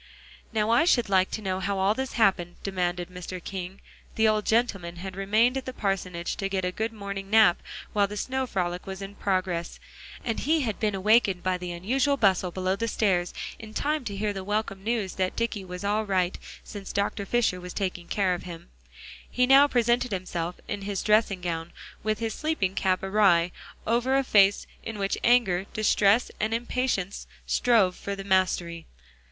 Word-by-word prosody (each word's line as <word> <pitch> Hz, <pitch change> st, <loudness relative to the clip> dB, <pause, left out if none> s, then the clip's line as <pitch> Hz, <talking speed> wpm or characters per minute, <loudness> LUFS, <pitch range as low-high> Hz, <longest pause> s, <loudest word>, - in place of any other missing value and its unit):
"Now 220 Hz, -1 st, +1 dB
I 235 Hz, +8 st, +5 dB
should 240 Hz, -, +3 dB
like 190 Hz, -1 st, +3 dB
to 220 Hz, -, -5 dB
know 185 Hz, -1 st, -1 dB
how 195 Hz, +1 st, -1 dB
all 190 Hz, +2 st, +3 dB
this 265 Hz, +3 st, -4 dB
happened," 185 Hz, -6 st, +2 dB
demanded 180 Hz, -2 st, -2 dB
Mr. 180 Hz, 0 st, -6 dB
King. 190 Hz, 0 st, -6 dB, 0.3 s
The 220 Hz, 0 st, +4 dB
old 215 Hz, -1 st, +1 dB
gentleman 195 Hz, -7 st, +1 dB
had 185 Hz, +2 st, -7 dB
remained 215 Hz, +6 st, +2 dB
at 265 Hz, -, -4 dB
the 255 Hz, -, -5 dB
parsonage 185 Hz, -5 st, -2 dB
to 195 Hz, -, -2 dB
get 190 Hz, -1 st, -1 dB
a 180 Hz, -, 0 dB
good 220 Hz, +4 st, -2 dB
morning 200 Hz, -2 st, -6 dB
nap 215 Hz, -5 st, +5 dB, 0.3 s
while 205 Hz, -1 st, +3 dB
the 210 Hz, +1 st, -7 dB
snow 260 Hz, +3 st, -2 dB
frolic 180 Hz, -4 st, -2 dB
was 190 Hz, 0 st, -6 dB
in 195 Hz, +1 st, -7 dB
progress. 185 Hz, -4 st, -2 dB, 0.5 s
And 225 Hz, -2 st, -1 dB
he 315 Hz, +3 st, +2 dB
had 220 Hz, -6 st, -2 dB
been 210 Hz, -2 st, 0 dB
awakened 195 Hz, -2 st, +3 dB
by 185 Hz, -1 st, 0 dB
the 180 Hz, 0 st, -5 dB
unusual 260 Hz, +11 st, +1 dB
bustle 190 Hz, -5 st, +3 dB
below 185 Hz, +1 st, -1 dB
stairs 200 Hz, -6 st, 0 dB, 0.3 s
in 220 Hz, -1 st, -11 dB
time 300 Hz, 0 st, 0 dB
to 200 Hz, -3 st, -4 dB
hear 210 Hz, 0 st, -1 dB
the 195 Hz, -1 st, -5 dB
welcome 200 Hz, -1 st, -2 dB
news 220 Hz, -4 st, -1 dB
that 185 Hz, -, 0 dB
Dicky 230 Hz, -4 st, -2 dB
was 180 Hz, 0 st, -7 dB
all 210 Hz, +2 st, +1 dB
right 185 Hz, -3 st, 0 dB, 0.3 s
since 200 Hz, -2 st, -8 dB
Dr. 200 Hz, 0 st, -1 dB
Fisher 225 Hz, -6 st, +1 dB
was 180 Hz, 0 st, -7 dB
taking 180 Hz, -3 st, -3 dB
care 195 Hz, -3 st, +1 dB
of 175 Hz, -, -4 dB
him. 170 Hz, -1 st, -9 dB, 0.6 s
He 250 Hz, -, +2 dB
now 275 Hz, +2 st, +7 dB
presented 240 Hz, -1 st, +1 dB
himself 180 Hz, -2 st, -3 dB
in 205 Hz, -, -4 dB
his 200 Hz, -1 st, -3 dB
dressing 210 Hz, -3 st, +2 dB
gown, 165 Hz, -1 st, -4 dB, 0.3 s
with 215 Hz, 0 st, 0 dB
his 225 Hz, 0 st, -2 dB
sleeping 305 Hz, -12 st, -1 dB
cap 190 Hz, -1 st, 0 dB
awry, 190 Hz, -4 st, +3 dB, 0.3 s
over 240 Hz, +4 st, +2 dB
a 275 Hz, -, +2 dB
face 200 Hz, -5 st, +4 dB, 0.2 s
in 225 Hz, -1 st, -6 dB
which 195 Hz, -1 st, -1 dB
anger, 200 Hz, -7 st, +3 dB
distress 215 Hz, +1 st, +3 dB
and 220 Hz, +1 st, 0 dB
impatience 235 Hz, -5 st, -2 dB, 0.2 s
strove 215 Hz, -7 st, +3 dB
for 200 Hz, -, -5 dB
the 195 Hz, -, -7 dB
mastery. 180 Hz, -3 st, 0 dB
200 Hz, 185 wpm, -27 LUFS, 185-225 Hz, 0.6 s, now